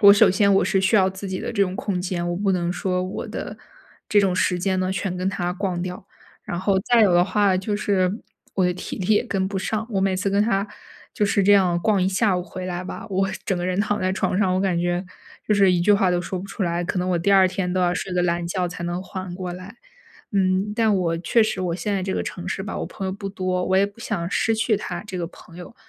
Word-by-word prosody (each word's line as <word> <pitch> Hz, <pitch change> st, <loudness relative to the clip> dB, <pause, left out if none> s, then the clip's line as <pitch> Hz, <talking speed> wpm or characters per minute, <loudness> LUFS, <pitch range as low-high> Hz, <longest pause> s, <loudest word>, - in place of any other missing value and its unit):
我 200 Hz, 0 st, +10 dB
首 205 Hz, 0 st, +6 dB
先 200 Hz, +1 st, +3 dB
我 -, -, +4 dB
是 195 Hz, -, +2 dB
需 190 Hz, +3 st, +3 dB
要 190 Hz, -1 st, +4 dB
自 190 Hz, +1 st, -6 dB
己 185 Hz, -, -3 dB
的 -, -, -4 dB
这 200 Hz, -3 st, +2 dB
种 185 Hz, 0 st, -1 dB
空 190 Hz, -4 st, -2 dB
间， 175 Hz, -1 st, -2 dB
我 175 Hz, -, -1 dB
不 195 Hz, +1 st, 0 dB
能 175 Hz, -1 st, 0 dB
说 180 Hz, 0 st, -1 dB
我 185 Hz, +2 st, -5 dB
的 -, -, -6 dB, 0.5 s
这 205 Hz, -, +5 dB
种 190 Hz, -2 st, +1 dB
时 180 Hz, -1 st, +1 dB
间 190 Hz, +1 st, 0 dB
呢， 185 Hz, 0 st, 0 dB
全 185 Hz, -1 st, -3 dB
跟 185 Hz, +1 st, -1 dB
他 180 Hz, -2 st, -2 dB
逛 185 Hz, -2 st, -2 dB
掉， 185 Hz, +2 st, -6 dB, 0.4 s
然 175 Hz, -, -4 dB
后 190 Hz, +1 st, +1 dB
再 240 Hz, +3 st, +3 dB
有 195 Hz, -4 st, +5 dB
的 175 Hz, +1 st, +5 dB
话 200 Hz, -2 st, +2 dB
就 205 Hz, +2 st, -2 dB
是 190 Hz, -3 st, +1 dB, 0.4 s
我 190 Hz, -, +2 dB
的 180 Hz, -, 0 dB
体 180 Hz, -, -6 dB
力 195 Hz, +3 st, +2 dB
也 210 Hz, -, +2 dB
跟 190 Hz, -5 st, -1 dB
不 195 Hz, 0 st, -4 dB
上， 215 Hz, +3 st, -2 dB
我 195 Hz, -, 0 dB
每 190 Hz, -1 st, +1 dB
次 195 Hz, +2 st, -1 dB
跟 200 Hz, +1 st, +2 dB
他 205 Hz, -2 st, +1 dB, 0.5 s
就 210 Hz, -, +1 dB
是 200 Hz, 0 st, +2 dB
这 205 Hz, -, +6 dB
样 180 Hz, -3 st, +4 dB
逛 200 Hz, -1 st, +2 dB
一 185 Hz, -, +2 dB
下 195 Hz, 0 st, +2 dB
午 180 Hz, -, -2 dB
回 185 Hz, 0 st, -7 dB
来 180 Hz, 0 st, -3 dB
吧， 220 Hz, +4 st, -7 dB
我 195 Hz, -1 st, 0 dB, 0.2 s
整 190 Hz, -4 st, +1 dB
个 175 Hz, -, -3 dB
人 185 Hz, +1 st, -1 dB
躺 205 Hz, 0 st, 0 dB
在 185 Hz, 0 st, 0 dB
床 190 Hz, -, -1 dB
上， 190 Hz, -2 st, +2 dB
我 -, -, +1 dB
感 185 Hz, -3 st, +1 dB
觉 175 Hz, +1 st, -1 dB, 0.4 s
就 210 Hz, -, +3 dB
是 195 Hz, -2 st, +5 dB
一 175 Hz, -, +2 dB
句 205 Hz, +4 st, +4 dB
话 195 Hz, -2 st, +3 dB
都 175 Hz, 0 st, +1 dB
说 180 Hz, +1 st, -4 dB
不 195 Hz, -, -7 dB
出 200 Hz, -, -3 dB
来， 170 Hz, 0 st, -1 dB
可 180 Hz, +2 st, -2 dB
能 180 Hz, -, -1 dB
我 175 Hz, -, +2 dB
第 200 Hz, +4 st, +1 dB
2 190 Hz, -1 st, +6 dB
天 185 Hz, -1 st, -2 dB
都 185 Hz, -, 0 dB
要 175 Hz, 0 st, +2 dB
睡 180 Hz, +1 st, -4 dB
个 180 Hz, -, +1 dB
懒 170 Hz, 0 st, 0 dB
觉 180 Hz, +1 st, -1 dB
才 170 Hz, 0 st, -7 dB
能 175 Hz, +1 st, -2 dB
缓 185 Hz, -1 st, -6 dB
过 180 Hz, -1 st, -4 dB
来。 185 Hz, +5 st, -10 dB, 0.6 s
嗯， 190 Hz, +2 st, +1 dB
但 220 Hz, -2 st, +3 dB
我 165 Hz, -2 st, 0 dB
确 205 Hz, +7 st, +2 dB
实 215 Hz, -3 st, -1 dB
我 180 Hz, -2 st, -1 dB
现 205 Hz, +1 st, -2 dB
在 190 Hz, -, -1 dB
这 190 Hz, 0 st, -2 dB
个 -, -, -1 dB
城 180 Hz, 0 st, -6 dB
市 195 Hz, -, -3 dB
吧， -, -, -5 dB
我 -, -, -2 dB
朋 195 Hz, -, -7 dB
友 190 Hz, -, -2 dB
不 200 Hz, 0 st, -5 dB
多， 185 Hz, -2 st, -2 dB
我 190 Hz, +1 st, +1 dB
也 195 Hz, -, +4 dB
不 205 Hz, +3 st, -14 dB
想 170 Hz, -6 st, -3 dB
失 225 Hz, -, +1 dB
去 220 Hz, -1 st, +2 dB
他 180 Hz, -1 st, -5 dB
这 190 Hz, -3 st, -6 dB
个 175 Hz, -, -2 dB
朋 170 Hz, -1 st, -16 dB
友。 180 Hz, +6 st, -10 dB
190 Hz, 295 characters per minute, -23 LUFS, 180-200 Hz, 0.6 s, 我